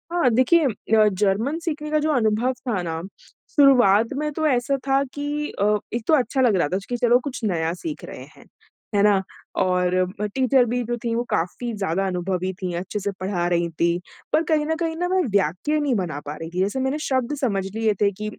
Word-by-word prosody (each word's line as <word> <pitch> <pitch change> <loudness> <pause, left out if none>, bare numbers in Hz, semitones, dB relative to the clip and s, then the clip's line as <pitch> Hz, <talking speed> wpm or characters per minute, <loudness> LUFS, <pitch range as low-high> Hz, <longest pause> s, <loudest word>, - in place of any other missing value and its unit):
हाँ, 345 -7 +3
देखिए 260 +7 +4
म 215 -1 +2
जर्मन 210 - +1
सीखने 305 -3 -4
का 305 - +3
जो 310 +1 +1
अनुभव 235 -1 +1
था 210 -7 0
ना, 165 -1 -3 0.5
शुरुआत 245 -7 +5
में 300 +1 -1
तो 315 +1 0
ऐसा 260 0 +1
था 270 0 +3
कि 295 +1 -3
अ, 210 +1 +3 0.2
एक 235 -1 -2
तो - - +3
अच्छा 265 -1 +2
लग 240 -5 +4
रहा 170 -5 +2
था - - +2
च 195 - -8
कि 245 - -1
चलो, 240 +1 +4
कुछ 255 0 -6
नया 165 -5 0
सीख 295 - -6
रहे - - -9
हैं। - - -17 0.5
है 200 - +4
ना? 205 -2 +4 0.3
और 185 +2 +1
टीचर 260 -1 +4
भी 245 +1 -1
जो 240 +1 -3
थीं, 230 -1 -1
वो 235 - 0
काफ़ी 210 +8 -2
ज़्यादा 195 -1 -1
अनुभवी 185 0 -2
थीं, 180 -2 -3
अच्छे 190 +4 -4
से 200 0 -2
पढ़ा 185 -2 -1
रही 170 -1 +1
थीं, 170 +1 0 0.3
पर 310 +2 +4
कहीं 305 -1 +2
न 320 +1 0
कहीं 330 -1 -1
ना 355 +2 -1
मैं 375 0 +2 0.2
वाक्य 195 - 0
नहीं 285 -4 +1
बना 170 -8 -2
पा 145 +1 -5
रही 160 +1 -7
थी। 175 +2 -5
जैसे 200 +7 0
मैंने 265 +3 0
शब्द 260 +1 0
समझ 200 -7 0
लिए 220 -1 +2
थे 200 -1 +4
कि 210 +2 -5
225 Hz, 220 wpm, -23 LUFS, 185-275 Hz, 0.5 s, शुरुआत